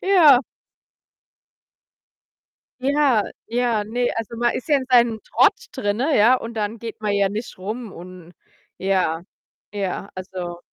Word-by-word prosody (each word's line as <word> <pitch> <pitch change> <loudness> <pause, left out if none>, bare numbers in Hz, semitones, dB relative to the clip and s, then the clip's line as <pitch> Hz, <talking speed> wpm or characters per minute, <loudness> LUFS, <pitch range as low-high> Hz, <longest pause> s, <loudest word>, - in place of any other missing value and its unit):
Ja.“ 325 -10 +6 2.4
Ja, 275 -5 +3 0.3
ja, 235 -3 +1
ne, 245 +3 -1
also, 225 +1 -5
man 240 0 +1
ist 255 - -5
ja 290 - +5
in 260 - -4
seinem 235 -3 +4
Trott - - +3 0.2
drinnen, 260 +3 0
ja, 230 +5 +6
und 230 -2 -6
dann 215 +1 -3
geht 225 -1 -8
man 210 - 0
ja 200 -1 +3
nicht 215 +2 -6
rum 215 +3 -5
und 180 0 -12 0.4
ja, 185 -4 0 0.5
ja, 195 0 -3
also 180 -2 -6
220 Hz, 135 wpm, -22 LUFS, 195-245 Hz, 2.4 s, Ja